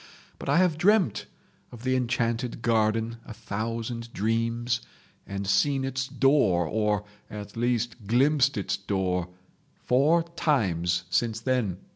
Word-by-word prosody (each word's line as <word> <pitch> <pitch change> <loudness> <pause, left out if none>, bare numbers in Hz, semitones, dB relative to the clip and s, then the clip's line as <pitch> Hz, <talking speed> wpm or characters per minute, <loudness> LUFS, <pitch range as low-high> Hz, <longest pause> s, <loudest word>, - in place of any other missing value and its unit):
But - - -6
I 145 - +4
have 175 -4 +3
dreamt 195 - +3 0.4
of 120 -1 -11
the 130 0 +1
enchanted 120 -1 -1
garden 115 0 +1
a 110 - -10
thousand 115 +3 -4
dreams, 115 +3 0 0.5
and 100 0 -4
seen 130 +8 +2
its 130 0 -2
door, 130 - +3
or 105 +2 0 0.2
at 105 -1 -8
least 120 -2 -1
glimpsed 135 +3 +3
its 100 - -1
door, 95 -3 -1 0.6
four 150 +7 +4
times 90 - +1
since 115 -2 +1
then. 115 -7 0
115 Hz, 125 wpm, -27 LUFS, 105-130 Hz, 0.6 s, I